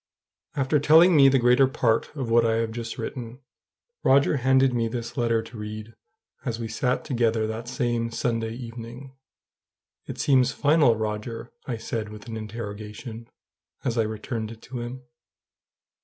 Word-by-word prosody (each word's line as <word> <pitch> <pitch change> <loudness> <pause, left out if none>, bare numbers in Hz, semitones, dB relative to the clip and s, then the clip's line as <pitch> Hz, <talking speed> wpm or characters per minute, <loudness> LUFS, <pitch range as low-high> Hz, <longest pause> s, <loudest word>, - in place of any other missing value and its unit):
After 140 +2 +2
telling 160 +5 +6
me 135 -2 +8
the 135 - +4
greater 125 +2 +5
part 115 -3 +1
of 135 -5 -3
what 115 0 +5
I 115 -1 +2
have 115 0 0
just 115 0 -5
written, 120 +1 -6 0.6
Roger 140 +2 +4
handed 130 0 +3
me 115 -1 +1
this 115 0 -5
letter 115 -3 +1
to 115 +1 -11
read, 110 +1 -7 0.5
as 115 -4 -3
we 115 - -3
sat 125 +3 -1
together 115 -4 +1
that 110 +2 -5
same 120 -3 -1
Sunday 115 -1 -1
evening. 120 +2 -9 0.9
"It - - -6
seems 130 -2 +3
final, 145 -5 +4
Roger?" 110 +2 -4 0.2
I 120 -3 -2
said 110 -1 -4
with 105 -1 -10
an 115 - -5
interrogation, 110 +1 -7 0.6
as 125 -4 -1
I 115 - +3
returned 110 +1 -3
it 115 0 -11
to 125 -1 -6
him. 120 +2 -6
115 Hz, 155 wpm, -25 LUFS, 115-130 Hz, 0.9 s, me